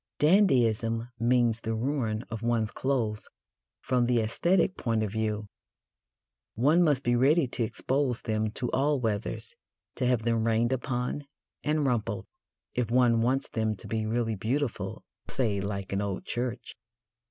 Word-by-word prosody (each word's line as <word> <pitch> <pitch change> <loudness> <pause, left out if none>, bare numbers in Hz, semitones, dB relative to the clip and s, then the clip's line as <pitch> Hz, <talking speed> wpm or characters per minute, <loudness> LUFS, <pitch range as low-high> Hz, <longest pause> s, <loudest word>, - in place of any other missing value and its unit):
Dandyism 120 - +3
means 120 -1 +2
the 115 0 -2
ruin 115 -3 -1
of 110 -1 -4
one's 115 -2 0
clothes 115 -6 -1 0.5
from 125 -2 +2
the 125 -1 +2
æsthetic 170 - +2
point 115 -2 0
of 105 - -2
view. 110 -1 -1 1.1
One 150 +9 +4
must 145 -6 +3
be 120 0 +2
ready 140 +6 +4
to 120 - -1
expose 130 +2 -1
them 110 -1 0
to 125 0 -3
all 140 +2 +2
weathers 105 - -2 0.4
to 125 - +1
have 125 -3 +2
them 115 -1 +1
rained 115 +2 +2
upon 130 +2 -2 0.4
and 150 -1 +1
rumpled 110 -6 -1 0.5
if 120 -3 -1
one 120 -2 +4
wants 130 +4 +1
them 110 -1 -1
to - - -9
be 110 -1 -2
really 115 0 0
beautiful, 125 +7 -2 0.3
say, 105 -6 0
like 100 -1 -4
an 100 - 0
old 100 -2 -3
church. 120 0 -3
120 Hz, 150 wpm, -28 LUFS, 110-130 Hz, 1.1 s, One